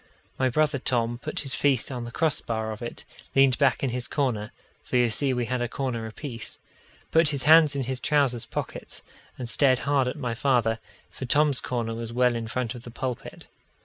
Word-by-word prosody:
My 130 Hz, 0 st, +3 dB
brother 150 Hz, +2 st, +1 dB
Tom 120 Hz, -2 st, 0 dB
put 155 Hz, +4 st, -2 dB
his 135 Hz, -2 st, -4 dB
feet 135 Hz, -3 st, +1 dB
on 120 Hz, -2 st, -4 dB
the 120 Hz, -, -7 dB
cross 155 Hz, +2 st, +1 dB
bar 110 Hz, -1 st, -3 dB
of 110 Hz, -, -7 dB
it, 120 Hz, -, -6 dB, 0.3 s
leaned 135 Hz, -2 st, +5 dB
back 140 Hz, -1 st, +3 dB
in 135 Hz, -, +1 dB
his 125 Hz, 0 st, -3 dB
corner 120 Hz, -8 st, -1 dB, 0.3 s
for -, -, 0 dB
you 120 Hz, -2 st, +3 dB
see 135 Hz, +4 st, +1 dB
we 125 Hz, -2 st, 0 dB
had 125 Hz, +2 st, -2 dB
a 120 Hz, -, 0 dB
corner 120 Hz, -3 st, -3 dB
apiece 115 Hz, +1 st, -5 dB, 0.5 s
put 165 Hz, 0 st, +5 dB
his 140 Hz, -3 st, -2 dB
hands 155 Hz, -1 st, +7 dB
in 135 Hz, -, 0 dB
his 130 Hz, 0 st, -3 dB
trousers 135 Hz, -6 st, +1 dB
pockets, -, -, -5 dB, 0.3 s
and 125 Hz, -, -5 dB
stared 130 Hz, +1 st, +3 dB
hard 140 Hz, -2 st, +2 dB
at 125 Hz, -, -3 dB
my 125 Hz, -5 st, -2 dB
father 115 Hz, -3 st, +1 dB, 0.3 s
for 130 Hz, -, -6 dB
Tom's 145 Hz, +1 st, +4 dB
corner 115 Hz, -2 st, -2 dB
was 115 Hz, 0 st, -5 dB
well 125 Hz, +1 st, +3 dB
in 115 Hz, -1 st, -3 dB
front 120 Hz, 0 st, -2 dB
of 120 Hz, -, -9 dB
the 120 Hz, -, -10 dB
pulpit. 125 Hz, +1 st, -5 dB
125 Hz, 210 wpm, -26 LUFS, 120-140 Hz, 0.5 s, hands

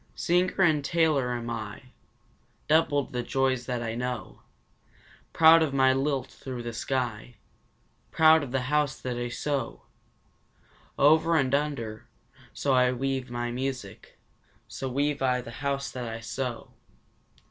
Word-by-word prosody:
Singer 180 Hz, +2 st, +1 dB
and 155 Hz, -4 st, +3 dB
tailor 155 Hz, -6 st, +1 dB
am 120 Hz, 0 st, -5 dB
I 115 Hz, +2 st, -7 dB, 0.8 s
Doubled 150 Hz, -4 st, +2 dB
the 125 Hz, -, -1 dB
joys 130 Hz, 0 st, 0 dB
that 120 Hz, -2 st, -2 dB
I 115 Hz, -1 st, -3 dB
know 125 Hz, -3 st, -5 dB, 0.9 s
Proud 165 Hz, 0 st, +7 dB
of 145 Hz, -4 st, 0 dB
my 130 Hz, -1 st, +4 dB
lilt 135 Hz, -1 st, -1 dB
through 125 Hz, -3 st, -7 dB
the 120 Hz, 0 st, -5 dB
sky, 120 Hz, -1 st, -3 dB, 0.7 s
Proud 160 Hz, 0 st, +5 dB
of 140 Hz, -4 st, -6 dB
the 135 Hz, 0 st, 0 dB
house 145 Hz, +2 st, 0 dB
that 125 Hz, -1 st, -4 dB
I 120 Hz, 0 st, -3 dB
sew 135 Hz, 0 st, -3 dB, 1.1 s
Over 160 Hz, +3 st, +4 dB
and 135 Hz, -4 st, +1 dB
under, 140 Hz, -7 st, -2 dB, 0.4 s
so 125 Hz, -2 st, +2 dB
weave 135 Hz, 0 st, -2 dB
I -, -, -13 dB
my 120 Hz, 0 st, -3 dB
music 125 Hz, -5 st, -5 dB, 0.5 s
so 135 Hz, -, -5 dB
weave 145 Hz, +2 st, -1 dB
I 125 Hz, -1 st, +2 dB
the 120 Hz, -1 st, -8 dB
house 140 Hz, -1 st, -2 dB
that 125 Hz, -2 st, -5 dB
I 115 Hz, 0 st, -5 dB
sew. 120 Hz, +1 st, -5 dB
130 Hz, 140 wpm, -27 LUFS, 120-145 Hz, 1.1 s, Proud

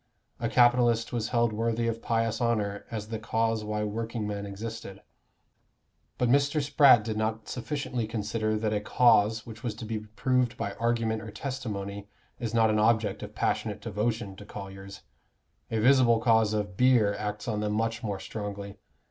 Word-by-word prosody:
A 115 Hz, -, -1 dB
capitalist 120 Hz, 0 st, +3 dB
was 115 Hz, -2 st, -1 dB
held 120 Hz, -2 st, +1 dB
worthy 115 Hz, +1 st, 0 dB
of 115 Hz, 0 st, -2 dB
pious 115 Hz, 0 st, 0 dB
honor 105 Hz, -4 st, 0 dB
as 110 Hz, -2 st, -5 dB
the 110 Hz, -1 st, -4 dB
cause 115 Hz, 0 st, 0 dB
why 105 Hz, 0 st, -2 dB
workingmen 105 Hz, -1 st, -3 dB
existed. 100 Hz, -1 st, -7 dB, 1.1 s
But 125 Hz, -, +1 dB
Mr. 140 Hz, +4 st, +3 dB
Spratt 140 Hz, -5 st, +6 dB
did 110 Hz, -1 st, -3 dB
not 110 Hz, 0 st, -2 dB
sufficiently 125 Hz, -3 st, -3 dB
consider 110 Hz, 0 st, -1 dB
that 110 Hz, 0 st, -1 dB
a 105 Hz, -, 0 dB
cause 110 Hz, -1 st, +3 dB
which 115 Hz, -1 st, -10 dB
was 115 Hz, -4 st, -3 dB
to 110 Hz, -, -7 dB
be 110 Hz, 0 st, -3 dB
proved 120 Hz, +3 st, 0 dB
by 100 Hz, -, -3 dB
argument 115 Hz, -1 st, 0 dB
or 110 Hz, -, -8 dB
testimony 100 Hz, -6 st, -5 dB, 0.3 s
is 115 Hz, -3 st, -3 dB
not 115 Hz, -1 st, +3 dB
an 105 Hz, -, +2 dB
object 110 Hz, -2 st, +2 dB
of -, -, -8 dB
passionate -, -, -1 dB
devotion 105 Hz, -1 st, -2 dB
to 105 Hz, -, -10 dB
colliers: 100 Hz, -1 st, -9 dB, 0.7 s
a 115 Hz, -, -1 dB
visible 120 Hz, -1 st, +5 dB
cause 110 Hz, -2 st, +3 dB
of 105 Hz, -3 st, -3 dB
beer 120 Hz, -3 st, +4 dB
acts 105 Hz, +1 st, -4 dB
on 110 Hz, -3 st, -1 dB
them 105 Hz, 0 st, -1 dB
much 115 Hz, +1 st, -1 dB
more 100 Hz, -3 st, -3 dB
strongly. 100 Hz, 0 st, -6 dB
110 Hz, 165 wpm, -28 LUFS, 105-115 Hz, 1.1 s, Spratt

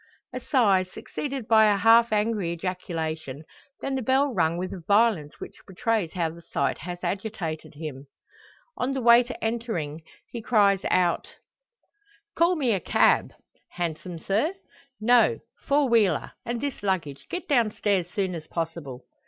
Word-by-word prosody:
A -, -, -3 dB
sigh, 210 Hz, -9 st, +3 dB
succeeded 260 Hz, +7 st, -6 dB
by 220 Hz, -1 st, +6 dB
a 200 Hz, -, +2 dB
half 230 Hz, +2 st, +5 dB
angry 210 Hz, -4 st, 0 dB
ejaculation; 160 Hz, -5 st, -4 dB, 0.4 s
then 275 Hz, -, -3 dB
the 265 Hz, -, -1 dB
bell 265 Hz, +3 st, +2 dB
rung 170 Hz, -4 st, +1 dB
with 185 Hz, +1 st, -4 dB
a 190 Hz, -, -6 dB
violence 205 Hz, -8 st, +2 dB
which -, -, -9 dB
betrays 195 Hz, -2 st, -1 dB
how 170 Hz, -4 st, -1 dB
the 170 Hz, +1 st, -13 dB
sight -, -, -2 dB
has 175 Hz, 0 st, -7 dB
agitated 180 Hz, -5 st, -4 dB
him. 145 Hz, -3 st, -7 dB, 0.7 s
On 260 Hz, +2 st, -1 dB
the 265 Hz, -, -2 dB
waiter 240 Hz, +1 st, +5 dB
entering, 220 Hz, -10 st, -3 dB, 0.3 s
he 235 Hz, -, -5 dB
cries 200 Hz, -4 st, +3 dB
out 175 Hz, -2 st, +1 dB, 1.0 s
"Call 340 Hz, +2 st, +3 dB
me 270 Hz, -7 st, +1 dB
a 195 Hz, -, 0 dB
cab." -, -, +3 dB, 0.4 s
"Hansom, 175 Hz, 0 st, -4 dB
sir?" 220 Hz, -, 0 dB, 0.4 s
"No! 235 Hz, +1 st, +4 dB, 0.3 s
four 285 Hz, 0 st, +3 dB
wheeler. 225 Hz, -5 st, +2 dB, 0.2 s
And 240 Hz, 0 st, -2 dB
this 285 Hz, -5 st, -4 dB
luggage; 180 Hz, -8 st, -2 dB
get 360 Hz, -, -5 dB
down 240 Hz, -6 st, +3 dB
stairs 195 Hz, -4 st, -1 dB
soon 190 Hz, -1 st, -2 dB
as 160 Hz, -2 st, -7 dB
possible." 165 Hz, -6 st, -5 dB
200 Hz, 150 wpm, -26 LUFS, 170-235 Hz, 1.0 s, by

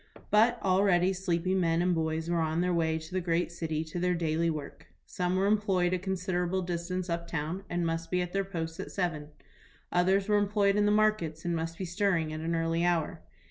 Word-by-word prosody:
But 230 Hz, +3 st, +4 dB
already 190 Hz, -1 st, +3 dB
sleepy 185 Hz, -1 st, -1 dB
men 170 Hz, -3 st, +2 dB
and 180 Hz, +1 st, +2 dB
boys 160 Hz, 0 st, -1 dB
were 170 Hz, 0 st, +1 dB
on 160 Hz, +1 st, 0 dB
their 180 Hz, 0 st, +1 dB
way 160 Hz, -1 st, +1 dB
to 160 Hz, +3 st, -9 dB
the 185 Hz, -, 0 dB
great 170 Hz, 0 st, 0 dB
city 160 Hz, -2 st, -3 dB
to 160 Hz, +2 st, -6 dB
their 180 Hz, 0 st, +1 dB
daily 165 Hz, 0 st, 0 dB
work. 150 Hz, -3 st, -6 dB, 0.2 s
Some 180 Hz, 0 st, -1 dB
were 190 Hz, +1 st, +2 dB
employed 195 Hz, -4 st, +2 dB
a 185 Hz, -, 0 dB
considerable 185 Hz, -1 st, -1 dB
distance 180 Hz, +1 st, -3 dB
up 170 Hz, -1 st, -3 dB
town, 165 Hz, +4 st, -3 dB
and 175 Hz, 0 st, -1 dB
must 165 Hz, 0 st, -2 dB
be 180 Hz, -, +1 dB
at 180 Hz, -, -7 dB
their 195 Hz, 0 st, +1 dB
posts 165 Hz, -3 st, -5 dB
at 195 Hz, -, -6 dB
seven. 170 Hz, -6 st, -2 dB, 0.6 s
Others 190 Hz, +3 st, +2 dB
were 210 Hz, -1 st, +4 dB
employed 200 Hz, -1 st, +2 dB
in 205 Hz, 0 st, +3 dB
the -, -, +3 dB
markets 210 Hz, -8 st, +1 dB
and 170 Hz, -1 st, 0 dB
must 165 Hz, 0 st, -3 dB
be 190 Hz, -, -4 dB
stirring 175 Hz, -3 st, 0 dB
at 155 Hz, -, -4 dB
an 165 Hz, +1 st, -1 dB
early 165 Hz, +1 st, 0 dB
hour. 170 Hz, -1 st, 0 dB
175 Hz, 215 wpm, -29 LUFS, 165-190 Hz, 0.6 s, But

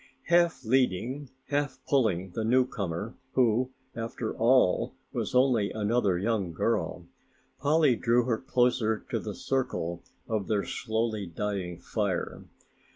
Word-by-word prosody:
Half 170 Hz, -5 st, +3 dB
leading, 130 Hz, +3 st, +1 dB, 0.2 s
half 145 Hz, -2 st, 0 dB
pulling 100 Hz, -10 st, +1 dB
the 110 Hz, -, -3 dB
newcomer, 115 Hz, -4 st, 0 dB, 0.2 s
who 125 Hz, 0 st, +3 dB, 0.3 s
after 115 Hz, 0 st, -4 dB
all 120 Hz, -5 st, +3 dB, 0.2 s
was -, -, -2 dB
only 125 Hz, -6 st, +4 dB
another 105 Hz, -3 st, +1 dB
young 100 Hz, -3 st, -1 dB
girl, -, -, -1 dB, 0.5 s
Polly 145 Hz, -2 st, +4 dB
drew 120 Hz, +1 st, +2 dB
her 115 Hz, -3 st, 0 dB
closer 120 Hz, -4 st, +1 dB
to -, -, 0 dB
the -, -, -6 dB
circle 125 Hz, -11 st, -2 dB, 0.3 s
of 110 Hz, -4 st, -1 dB
their 105 Hz, -2 st, +1 dB
slowly 110 Hz, -3 st, -2 dB
dying 90 Hz, 0 st, -3 dB
fire. 100 Hz, -1 st, -2 dB
115 Hz, 120 wpm, -28 LUFS, 100-130 Hz, 0.5 s, only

